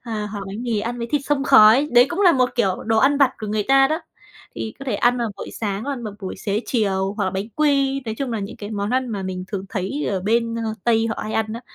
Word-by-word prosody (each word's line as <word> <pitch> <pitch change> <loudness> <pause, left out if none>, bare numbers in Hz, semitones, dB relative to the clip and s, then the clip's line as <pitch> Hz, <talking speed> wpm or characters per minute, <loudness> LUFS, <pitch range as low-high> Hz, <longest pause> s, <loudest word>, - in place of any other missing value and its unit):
Ờ, 220 -3 -3
hoặc 205 -1 -6
bánh 205 +5 -6
mì 230 -4 -1
ăn 240 +3 -4
với 235 - -3
thịt 295 - +1
xông 275 -1 0
khói, 265 +2 +6
đấy 245 +1 +7
cũng 345 +5 -3
là 360 -4 +6
một 255 -1 +2
kiểu 190 -6 0
đồ 225 -1 +2
ăn 280 +4 +4
vặt 275 -2 +5
của 215 - -5
người 210 0 -1
ta 270 0 +5
đó. 315 +3 -1 0.5
Thì 220 - -5
có 275 - -8
thể 260 - -1
ăn 245 +1 +2
vào 235 - -1
buổi - - -7
sáng, 205 0 -2
ăn 275 -4 -4
vào 210 -2 -6
buổi 190 - -6
xế 205 +1 -2
chiều 195 -4 0
hoặc - - 0
là 190 - 0
bánh 195 +3 -4
quy, 275 -2 +2
nói 220 -2 -3
chung 265 -4 -2
là 225 - -1
những 210 +4 -6
cái 210 -1 -8
món 205 0 -2
ăn 255 0 0
mà 200 -4 -4
mình 185 -1 -4
thường 195 -3 -4
thấy 200 +11 -3
ở 190 -2 -1
bên, 230 +3 0
ơ, 225 -1 -3
tây 225 -1 +3
họ 220 - -3
hay 215 - -5
ăn 220 -1 0
á, 235 - -6
230 Hz, 285 wpm, -21 LUFS, 205-260 Hz, 0.5 s, đấy